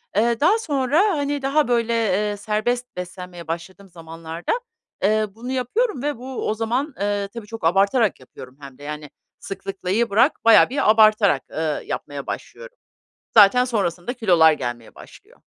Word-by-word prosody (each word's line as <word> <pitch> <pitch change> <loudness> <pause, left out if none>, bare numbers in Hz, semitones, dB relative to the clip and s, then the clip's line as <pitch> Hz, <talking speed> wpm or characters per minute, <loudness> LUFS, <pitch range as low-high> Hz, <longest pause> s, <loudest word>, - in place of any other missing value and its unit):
Eee, 230 +2 +2
daha 355 +9 +4
sonra, 285 - 0 0.2
hani, 285 0 -2
daha, 275 +2 +1
böyle, 235 -1 +1
eee, 210 -2 0
serbest 220 +4 -2
beslenmeye 180 -1 -8
başladığım 185 +4 -7
zamanlarda, 165 0 -7 0.5
eee, 215 +2 +2
bunu 240 +3 -7
yapıyorum 265 - -1
ve 290 -2 -2
bu 255 +2 -5
o - - +1
zaman, 240 +7 -2
eee, 205 0 -1
tabii 230 -3 -8
çok 225 0 -9
abartarak 200 +5 +2
yapıyorum 130 0 -13
hem 135 -2 -11
de, 145 - -14
yani, 150 0 -7 0.3
sıklıklayı 195 +3 -3
bırak 230 +9 +3
bayağı 225 -1 +7
bir 270 -3 +1
abartarak, 215 -8 +4
eee, 155 -1 -2
yapmaya 140 -1 -6
başlıyorum. - - -8 0.6
Zaten 225 +4 +6
sonrasında 200 -3 -2
kilolar 175 -10 +4
gelmeye 120 -5 -6
başlıyor. - - -16
215 Hz, 150 wpm, -22 LUFS, 175-250 Hz, 0.6 s, bayağı